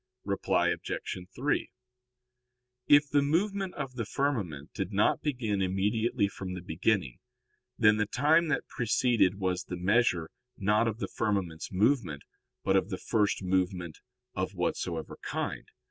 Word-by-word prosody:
Reply 100 -1 +1
Obj. - - -2 0.4
3: 140 +4 0 1.2
If 145 0 +6
the 145 0 +3
movement 190 +6 0
of 135 -3 -4
the 115 -3 -3
firmament 105 - -2
did - - -3
not - - +2
begin 115 -8 -1
immediately 100 +3 +1
from 95 -2 -6
the 90 - -6
beginning, 90 - 0 0.6
then 105 0 +5
the 105 -1 +1
time 155 +8 +3
that 150 - -1
preceded 115 -4 +2
was 95 -1 -1
the 90 - -5
measure, 90 -3 +2 0.3
not 105 +3 +2
of 110 -1 -2
the - - -3
firmament's 95 -7 -2
movement, 100 - +1 0.4
but 95 - +2
of 95 0 +2
the 95 - -3
first 105 -2 0
movement 90 -2 -1 0.3
of 95 +1 -3
whatsoever 85 -2 -3
kind. - - -4
105 Hz, 140 wpm, -29 LUFS, 90-125 Hz, 1.2 s, If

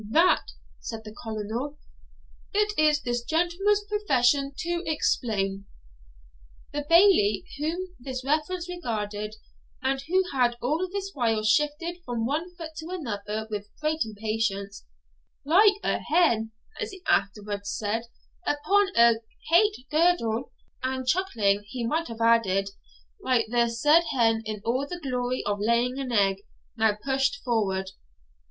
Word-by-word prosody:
'That,' 330 +10 +3 0.3
said 225 -1 -6
the 215 - -9
Colonel, 225 +7 -5 0.8
'it 420 +1 +2
is 300 -1 +3
this 240 -1 -1
gentleman's 350 +8 +1
profession 280 -10 +2
to 345 0 -2
explain.' 200 -10 0 1.1
The 290 0 -3
Bailie, 335 - +5
whom 355 +4 -3
this 255 0 -5
reference 315 +5 0
regarded, 215 -11 -4 0.4
and 265 0 -1
who 365 +7 +2
had 245 -2 +2
all 310 +10 -1
this 395 0 -4
while 225 -5 0
shifted 300 +9 +1
from 235 -6 -2
one 325 +7 -2
foot 330 -2 -7
to 320 0 -6
another 220 - -4
with 205 -1 -4
great 310 +1 0
impatience, 215 -2 -3 0.6
'like 400 +7 +6
a - - +1
hen,' 235 -10 +2 0.3
as 435 -2 -2
he 380 -3 -12
afterwards 200 0 0
said, 220 +2 -2 0.4
'upon 390 +8 +2
a 235 -1 +6 0.3
het 415 +5 +5 0.2
girdle'; 300 -8 +2 0.3
and 260 0 -2
chuckling, 235 - +1
he 235 +3 -4
might 320 +8 0
have 230 -1 -8
added, 200 -4 +3 0.5
like 250 -3 +2
the 240 -1 +3
said 295 +9 +4
hen 225 -2 +3
in 215 -1 -4
all 255 +5 0
the 355 +2 -6
glory 255 -3 -2
of 205 0 -1
laying 235 +4 +1
an 260 -2 -3
egg, 195 -4 +3 0.4
now 220 -2 +2
pushed 270 - 0
forward. 195 -6 0
255 Hz, 135 wpm, -26 LUFS, 220-330 Hz, 1.1 s, like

